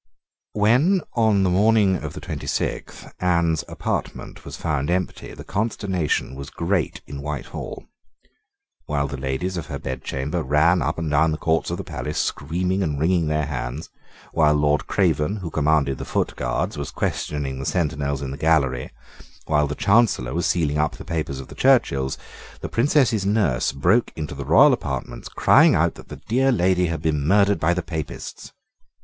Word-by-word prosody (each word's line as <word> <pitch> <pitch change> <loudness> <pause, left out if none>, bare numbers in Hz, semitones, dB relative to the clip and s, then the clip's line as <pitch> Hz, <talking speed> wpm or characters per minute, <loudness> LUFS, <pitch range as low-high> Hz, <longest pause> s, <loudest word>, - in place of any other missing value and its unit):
When, 125 - +3
on 110 -4 +3
the 95 - +2
morning 100 0 +4
of - - -6
the - - -7
twenty - - -6
sixth, - - -4
Anne's 85 -3 +1
apartment - - -4
was - - -7
found 75 -3 -1
empty, 90 0 -2
the - - -9
consternation 100 - -1
was 70 0 -7
great 85 -3 -1
in 70 -1 -7
Whitehall. 75 -1 -6 1.0
While 70 -1 0
the 70 - -5
Ladies 70 +8 -3
of 85 - -5
her - - -4
Bedchamber 65 +5 -3
ran 80 +5 +3
up - - -1
and 80 -3 -3
down 75 +2 +3
the 75 - -1
courts 80 +1 0
of 85 - -2
the - - -5
palace, 75 0 -5
screaming 90 +6 -1
and 75 -6 -1
wringing 85 +1 +2
their 75 0 0
hands, 65 +1 -5 0.4
while 75 -2 +3
Lord 75 0 +1
Craven, 90 -1 +1
who 95 -6 -6
commanded 75 -3 +1
the - - -4
Foot - - -1
Guards, - - -2
was - - -4
questioning 70 -3 -3
the 65 - -5
sentinels 70 -4 -1
in 65 - -4
the 70 - -6
gallery, 70 -4 +1 0.6
while 75 -1 +2
the 75 - -4
Chancellor 100 - +2
was 85 - 0
sealing 75 -4 +1
up 75 0 0
the - - -10
papers 75 -5 -3
of 65 - -8
the - - -11
Churchills, 70 - +2 0.4
the - - -4
Princess's 120 -4 +2
nurse 95 - +1
broke 90 - +2
into 75 -2 -5
the 70 -1 -6
royal 135 - +6
apartments 65 - -4
crying - - +5
out - - +2
that - - -14
the - - -10
dear 130 +4 +3
lady 90 -5 +2
had 80 -2 -4
been 75 -2 +1
murdered 100 +1 +4
by 85 +3 +2
the 90 - -2
Papists. 80 -2 -6
80 Hz, 175 wpm, -23 LUFS, 70-95 Hz, 1.0 s, royal